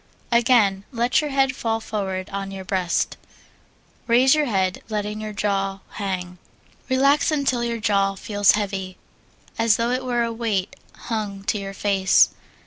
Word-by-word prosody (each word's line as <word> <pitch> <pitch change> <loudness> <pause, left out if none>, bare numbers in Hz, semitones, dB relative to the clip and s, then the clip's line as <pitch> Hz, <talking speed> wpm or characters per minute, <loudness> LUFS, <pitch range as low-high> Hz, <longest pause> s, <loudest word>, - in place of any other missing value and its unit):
Again, 230 -5 +3
let 240 +3 +2
your 300 - -3
head 270 -1 +1
fall 225 -2 -1
forward 195 -4 -4
on 195 0 -4
your 190 -1 -7
breast; 185 -3 -1 0.9
raise 250 +3 +5
your 305 -1 +2
head, 190 -4 0
letting 210 0 -3
your 215 0 -5
jaw 195 -1 -1
hang. 180 -3 -4 0.5
Relax 275 +3 +3
until 275 -5 0
your 235 -1 -2
jaw 200 -2 +1
feels 205 0 +2
heavy, 195 -3 -3 0.6
as 225 -2 +4
though 235 +1 0
it 255 +1 -1
were 240 -2 0
a 230 0 -2
weight 220 -5 -2 0.2
hung 210 -4 -4
to 200 +2 -1
your 195 0 -6
face. 195 -1 +4
210 Hz, 150 wpm, -23 LUFS, 195-235 Hz, 0.9 s, raise